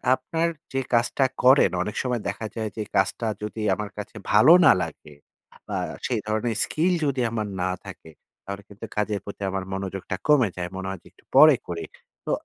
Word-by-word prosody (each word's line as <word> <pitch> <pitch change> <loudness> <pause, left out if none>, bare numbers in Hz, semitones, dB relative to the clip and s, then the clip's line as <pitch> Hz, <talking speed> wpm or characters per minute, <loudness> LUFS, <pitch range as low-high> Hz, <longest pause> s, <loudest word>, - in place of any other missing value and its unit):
আপনার 160 +6 -1 0.3
যে 135 - +1
কাজটা 120 +3 +2 0.2
করেন 130 +3 +6
অনেক 105 +2 -5
সময় 125 -3 -1
দেখা 110 - -5
যায় 110 -2 -2
যে 110 - -1
কাজটা 115 - +1 0.2
যদি 105 +1 -5
আমার 105 0 -5
কাছে 105 +2 -7 0.2
ভালো 110 +11 +7
না 140 - +9
লাগে 80 -2 -9 0.5
বা, - - -3 0.3
সেই 120 -3 0
ধরনের 110 +2 -1
স্কিল 175 +4 +1
যদি 135 -3 0
আমার 110 -2 -2 0.2
না 95 - 0
থাকে, 80 - -11 0.3
তাহলে 100 0 -6
কিন্তু 100 +2 -9
কাজের 105 -1 0
প্রতি 100 - -9
আমার 95 0 -2
মনোযোগটা 95 -1 -4
কমে 140 -8 +5
যায়। 90 -1 -3
মনে 95 0 -4
হয় 95 -1 -5
যে - - -17
একটু - - -27
পরে - - +9
করি। - - -4 0.4
তো - - -2
110 Hz, 190 wpm, -25 LUFS, 100-125 Hz, 0.5 s, না